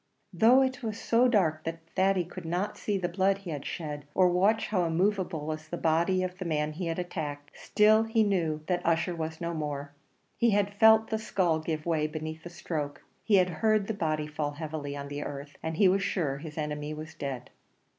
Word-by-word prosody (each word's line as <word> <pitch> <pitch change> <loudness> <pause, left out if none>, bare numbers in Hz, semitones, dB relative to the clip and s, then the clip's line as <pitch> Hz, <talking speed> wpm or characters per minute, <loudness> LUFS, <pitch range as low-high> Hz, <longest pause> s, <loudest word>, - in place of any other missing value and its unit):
Though 235 +9 +6
it 260 -1 -2
was 220 -2 -4
so 235 +3 +3
dark 165 -10 +2
that 165 0 -6
Thady 190 -1 +2
could 175 - -9
not 175 +5 -2
see 205 -2 -1
the 180 -2 -1
blood 190 +2 +1
he 195 -4 -7
had 145 -2 -5
shed, 150 -3 -5
or 185 -1 +5
watch 195 +5 +2
how 185 -4 +1
immovable 180 -2 0
was 155 0 -5
the 175 - -5
body 170 +4 +2
of 185 0 -5
the 185 - -4
man 150 -2 0
he 170 +3 -4
had 165 - -2
attacked, 150 -5 -5
still 215 +1 +4
he 225 0 +2
knew 165 -7 0
that 175 0 -1
Ussher 170 +1 +1
was 160 0 -4
no 170 0 -3
more. 145 -2 -4 0.4
He 235 - +3
had 205 0 0
felt 220 +2 +5
the 220 - 0
skull 185 -7 +1
give 155 -1 -3
way 160 -3 +1
beneath 155 +1 -6
the 175 - -7
stroke; 155 -4 -5 0.2
he 215 - +3
had 180 -1 +4
heard 215 -2 +3
the 220 - -2
body 155 -5 -1
fall 150 -1 -3
heavily 145 -2 -5
on 140 0 -6
the 145 +1 -5
earth, 145 0 -7
and 160 0 -3
he 195 - +6
was 195 +2 +3
sure 155 -8 -1
his 150 0 -9
enemy 150 0 -3
was 155 +1 -8
dead. 130 -3 -6
170 Hz, 215 wpm, -29 LUFS, 155-195 Hz, 0.4 s, Though